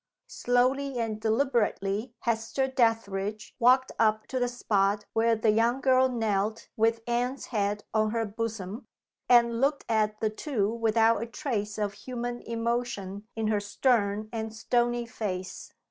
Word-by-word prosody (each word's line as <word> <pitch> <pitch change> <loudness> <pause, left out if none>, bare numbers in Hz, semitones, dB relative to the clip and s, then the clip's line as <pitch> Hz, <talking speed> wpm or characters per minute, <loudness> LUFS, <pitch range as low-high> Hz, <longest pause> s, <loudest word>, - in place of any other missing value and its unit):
Slowly 255 +2 +1
and 220 -2 -2
deliberately 225 -2 0
Hester 235 +3 0
Dethridge 215 -4 0
walked 255 +2 +4
up 215 -1 +2
to 260 - -1
the 245 - +1
spot 205 -4 0
where 225 +1 +3
the 220 0 +2
young 230 +4 +2
girl 260 -1 +4
knelt 220 -2 -1
with 225 +1 +2
Anne's 245 +3 -1
head 205 -1 0
on 215 -1 +2
her 225 +1 -1
bosom, 220 0 -5 0.4
and 235 -1 +5
looked 280 +1 +1
at 215 -1 +1
the 220 -1 0
two 215 -3 -1
without 225 -1 +3
a 230 - -3
trace 225 -5 -3
of 205 -1 -1
human 240 +1 -5
emotion 230 -4 -3
in 225 -1 -2
her 210 -1 +2
stern 205 -1 +1
and 220 -1 -4
stony 240 +1 0
face. 190 -6 -5
225 Hz, 145 wpm, -28 LUFS, 210-245 Hz, 0.4 s, and